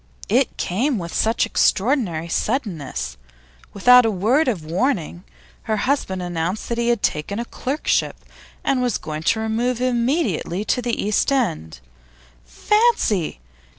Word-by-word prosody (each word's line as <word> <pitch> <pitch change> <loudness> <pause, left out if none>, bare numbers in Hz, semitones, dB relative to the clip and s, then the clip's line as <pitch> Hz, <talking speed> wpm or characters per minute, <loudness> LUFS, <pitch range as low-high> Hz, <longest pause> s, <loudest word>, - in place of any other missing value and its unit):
It - - +2
came 240 +9 0
with 170 -3 -6
such 225 +1 +1
extraordinary 195 - +1
suddenness. 160 - -3 0.5
Without 250 +5 +6
a 225 - +2
word 225 - +2
of 190 -11 -1
warning, 175 - -1 0.5
her 215 - +1
husband 200 -7 -1
announced 175 +3 -3
that 235 0 -1
he 235 - 0
had 240 -3 +1
taken 150 +7 -1
a 235 - -3
clerkship 275 +5 -1 0.5
and 265 -2 +1
was 245 -4 0
going 155 0 -6
to 220 +7 +1
remove 230 +3 -1
immediately 240 - 0
to 250 - 0
the 240 -1 -2
East 210 +6 +1
end. 80 - -1 0.6
Fancy! 225 - +1
220 Hz, 135 wpm, -21 LUFS, 170-250 Hz, 0.6 s, Without